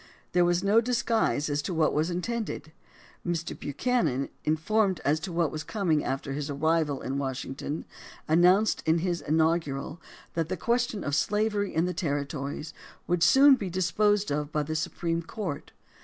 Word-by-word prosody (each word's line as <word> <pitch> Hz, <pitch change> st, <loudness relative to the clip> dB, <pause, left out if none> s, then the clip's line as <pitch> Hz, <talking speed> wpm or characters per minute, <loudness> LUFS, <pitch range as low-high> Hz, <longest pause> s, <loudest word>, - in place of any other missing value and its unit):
There 180 Hz, 0 st, +4 dB
was 175 Hz, +1 st, +1 dB
no 210 Hz, +3 st, +5 dB
disguise 230 Hz, -9 st, +1 dB
as 145 Hz, 0 st, 0 dB
to 175 Hz, +4 st, -4 dB
what 160 Hz, -1 st, +2 dB
was 155 Hz, +3 st, +1 dB
in 175 Hz, 0 st, -2 dB
tended. 230 Hz, -9 st, -4 dB, 0.5 s
Mr. 170 Hz, -1 st, -2 dB
Buchanan, 145 Hz, -, -1 dB
informed 185 Hz, +5 st, +1 dB
as 150 Hz, +2 st, +2 dB
to 180 Hz, +3 st, -6 dB
what 170 Hz, -3 st, +1 dB
was 155 Hz, -, -5 dB
coming 175 Hz, -8 st, 0 dB
after 135 Hz, +1 st, -3 dB
his 145 Hz, +1 st, -4 dB
arrival 150 Hz, 0 st, 0 dB
in 135 Hz, +1 st, -2 dB
Washington, 135 Hz, +2 st, -4 dB, 0.4 s
announced 180 Hz, +6 st, +4 dB
in 160 Hz, +1 st, +4 dB
his 175 Hz, -2 st, -1 dB
inaugural 160 Hz, -1 st, 0 dB, 0.3 s
that 165 Hz, -1 st, -1 dB
the 185 Hz, -, -2 dB
question 235 Hz, +1 st, 0 dB
of 140 Hz, -, -3 dB
slavery 210 Hz, +5 st, 0 dB
in 160 Hz, +2 st, +2 dB
the 180 Hz, -, -2 dB
ter 145 Hz, -6 st, -1 dB
ritories 145 Hz, +2 st, -5 dB, 0.3 s
would 175 Hz, -1 st, 0 dB
soon 270 Hz, +10 st, +7 dB
be 205 Hz, -8 st, -1 dB
disposed 200 Hz, +2 st, +1 dB
of 150 Hz, +1 st, -2 dB
by 150 Hz, -1 st, 0 dB
the 155 Hz, +2 st, -4 dB
Supreme 165 Hz, +1 st, -1 dB
Court. 170 Hz, -4 st, -5 dB
165 Hz, 170 wpm, -28 LUFS, 150-200 Hz, 0.5 s, soon